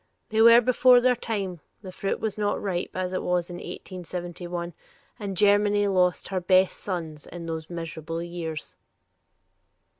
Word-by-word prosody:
They 220 0 +2
were 230 +1 +9
before 250 +1 +5
their 250 +1 +4
time; 200 -7 -3 0.2
the 185 - -7
fruit 195 +1 -2
was 220 -2 -2
not 205 -1 0
ripe, 180 -3 -2
as 185 0 -2
it 185 - -1
was 180 0 -1
in 175 - -6
1871, 175 -1 -6 0.5
and 200 -3 -4
Germany 205 +1 +4
but 200 - +1
lost 180 -1 +1
her 190 -1 -1
best 185 +1 +3
sons 160 -6 -5
in 170 -1 -8
those 160 -1 -5
miserable 165 -1 -5
years." 170 -3 -6
185 Hz, 155 wpm, -26 LUFS, 170-205 Hz, 0.5 s, were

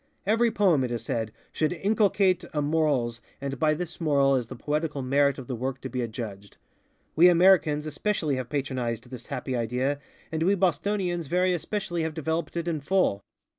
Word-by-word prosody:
Every 225 +4 +3
poem, 190 - +3
it 125 - -1
is 120 -2 -3
said, 110 -2 -2 0.2
should 155 +2 0
inculcate 195 -1 +2
a - - +2
morals 145 -7 +1 0.2
and 135 -1 -4
by 155 -1 +3
this 175 +1 -6
moral 140 -3 +3
is 125 -3 -1
the 125 - -8
poetical 150 +1 -2
merit 140 +1 +2
of 135 - -7
the 125 - -4
work 130 +2 -3
to 130 - -5
be 125 - -2
adjudged. 110 -4 -6 0.6
We 175 +3 +7
Americans 170 -4 +4
especially 155 -1 -1
have 130 -2 -4
patronized 125 -4 -3
this 125 - -9
happy 130 - -3
idea, 125 +4 -1 0.3
and 160 -1 -2
we 190 +5 +3
Bostonians 180 -1 0
very 180 +3 +2
especially 175 0 -2
have 160 -1 -2
developed 160 +1 -2
it 170 0 -2
in 165 -3 -1
full. 175 - +1
150 Hz, 180 wpm, -27 LUFS, 130-175 Hz, 0.6 s, We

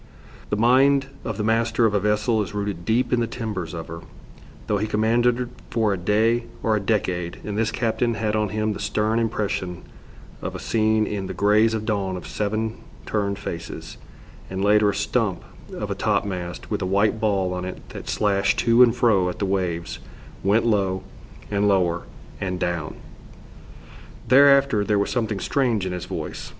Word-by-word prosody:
The - - +1
mind 135 +4 +4
of - - -4
the 105 - -1
master 115 +1 +2
of 110 - +2
a 100 - +3
vessel 105 +2 +1
is 105 - -5
rooted 100 -4 -3
deep 120 +5 +1
in 125 - +3
the 115 - 0
timbers 105 -8 -4
of 80 -1 -6
her, 85 0 -7 0.7
though 105 -1 0
he 110 - -1
commanded 120 +3 +2 0.2
for 110 -3 +1
a - - -2
day 110 +6 +2 0.2
or 110 -1 +2
a - - +1
decade, 90 -4 -1
and 105 - -4
this 110 +1 +1
captain 115 +1 0
had 110 0 -1
on 105 -1 +1
him 110 +1 -1
the - - -7
stern 110 +2 0
impression 105 -6 -2 0.6
of - - -5
a - - -5
scene 110 -1 +2
in 100 -3 -3
the - - -6
greys 110 +2 +3
of 110 -1 -3
dawn 100 -4 -1
of 90 - -9
seven 110 +2 -2 0.3
turned 100 -2 -1
faces, 85 -4 -7 0.5
and 95 +1 -2
later 105 0 +5
a 100 - -1
stump 100 -3 0 0.3
of - - -4
a - - -4
top - - +2
mast 90 -3 -5
with - - -1
a 90 - -1
white 100 +3 +2
ball 95 -4 +1
on 90 0 -3
it 95 0 -7
that - - -8
slashed 100 -2 +1
to 115 +1 +4
and 120 -1 +6
fro 105 -7 +3
at - - -6
the 100 - -1
waves, 90 -3 -2 0.4
went 105 +4 +3
low 95 -4 +1 0.5
and 100 0 +2
lower, 90 -4 +1 0.3
and 95 -2 -3
down. 85 -3 -2 1.3
Thereafter 140 -4 +6
there 105 0 +1
was 100 - 0
something 110 -5 -1
strange 115 -3 0
in 95 - -2
his 90 -1 -5
voice. - - -6
105 Hz, 185 wpm, -23 LUFS, 95-115 Hz, 1.3 s, and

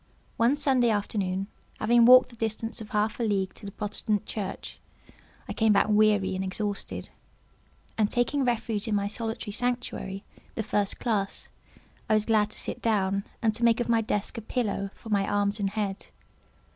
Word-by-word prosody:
One 240 +5 +3
Sunday 260 -4 +3
afternoon, 195 -3 -1 0.3
having 235 +2 +5
walked 255 +1 +8
the - - -14
distance 225 +1 -3
of 215 - -8
half 215 +2 0
a - - 0
league 195 -4 0
to 205 - -10
the - - -6
Protestant 210 0 -2
church, 195 -3 -6 0.7
I - - -4
came 220 -1 +3
back 200 - +3
weary 210 -2 +3
and 190 - -2
exhausted; 200 +2 -4 0.9
and 210 -1 +3
taking 260 +3 +1
refuge 230 -3 -1
in 215 - +1
my 200 0 0
solitary 225 0 -3
sanctuary, 240 -4 -2 0.3
the 220 - -2
first 205 -2 -1
classe, 205 -5 -2 0.6
I 215 - +5
was 215 0 +1
glad 215 -2 +3
to - - -11
sit - - -3
down, 200 -3 +1 0.2
and 220 -1 +3
to 235 - -4
make 235 0 +4
of 240 - -1
my 230 -1 +4
desk 215 0 -2
a - - -8
pillow 210 -4 -2
for 225 - -12
my 200 -2 +1
arms 205 +1 0
and 200 -1 0
head. 200 -2 -3
215 Hz, 180 wpm, -27 LUFS, 200-230 Hz, 0.9 s, walked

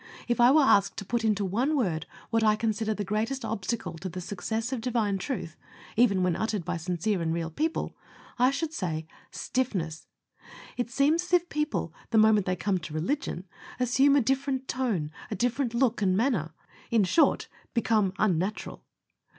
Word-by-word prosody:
If 240 0 +1
I 240 - +8
were 295 +2 +6
asked 200 -7 +4
to 200 - -5
put 235 +3 -1
into 210 -2 +1
one 250 +11 +1
word 170 - -1 0.2
what 225 -1 +2
I 215 -1 +5
consider 220 0 -1
the 205 - -2
greatest 225 +6 -1
obstacle 225 +1 -3
to 185 +3 -4
the 180 - -6
success 220 +7 -3
of 250 - -3
Divine 220 -5 0
Truth, 185 - -4 0.4
even 200 -5 +4
when 180 -2 +2
uttered 215 -5 -2
by - - -2
sincere 180 +3 -1
and 165 -1 0
real 165 0 -2
people, 315 - -2 0.4
I 250 +1 +6
should 300 +3 -2
say, 160 - -3 0.2
stiffness. 185 -12 -2 0.7
It 245 -1 -2
seems 285 +7 +3
as 360 - -10
if 355 0 +3
people, 300 - -2 0.2
the 230 - +2
moment 215 -2 +5
they 185 - +1
come 190 0 0
to 155 -2 -8
religion, 190 - -2 0.3
assume 265 +3 +4
a 285 - +5
different 265 +1 -1
tone, 215 -13 -1 0.2
a - - -2
different 245 +3 0
look, 240 -2 +2
and 185 -2 +2
manner 195 - 0 0.5
short, 255 - +3 0.3
become 220 -4 +2
unnatural. 190 0 -1
220 Hz, 175 wpm, -28 LUFS, 185-255 Hz, 0.7 s, I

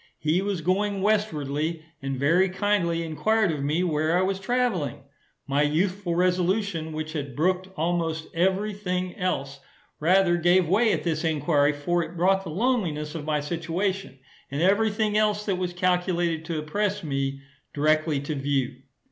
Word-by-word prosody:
He 155 +4 +1
was 200 -3 -2
going 195 +3 0
westwardly, 160 -6 0 0.2
and 135 -1 -3
very 170 +8 +3
kindly 185 -4 0
enquired 195 +5 +1
of 150 -3 -3
me 155 +5 +1
where 160 0 +1
I 185 - +2
was 190 0 -1
travelling? 195 - -1 0.4
My 140 +1 +1
youthful 175 +4 0
resolution, 180 -1 +1
which 155 0 -5
had 140 -5 -4
brooked 185 +5 0
almost 165 -1 -1
every 190 +5 +1
thing 185 -2 -3
else, 140 -7 -2 0.4
rather 175 +2 +4
gave 175 +1 +3
way 215 +6 +3
at - - -1
this 160 -1 -1
enquiry; 150 -2 +2
for 170 +5 0
it 165 +2 -9
brought 190 +3 +3
the 180 - -7
loneliness 170 -7 -1
of 160 -3 -5
my 150 -1 0
situation, 170 +1 -2 0.3
and 140 - -3
every 205 +4 +4
thing 210 0 0
else 210 -1 +1
that 195 -3 0
was 180 -1 -1
calculated 175 -2 0
to 165 -1 -3
oppress 205 +6 -1
me, 135 -2 -2 0.3
directly 155 0 +1
to 145 +2 -3
view. 135 -3 -1
175 Hz, 160 wpm, -25 LUFS, 155-195 Hz, 0.4 s, rather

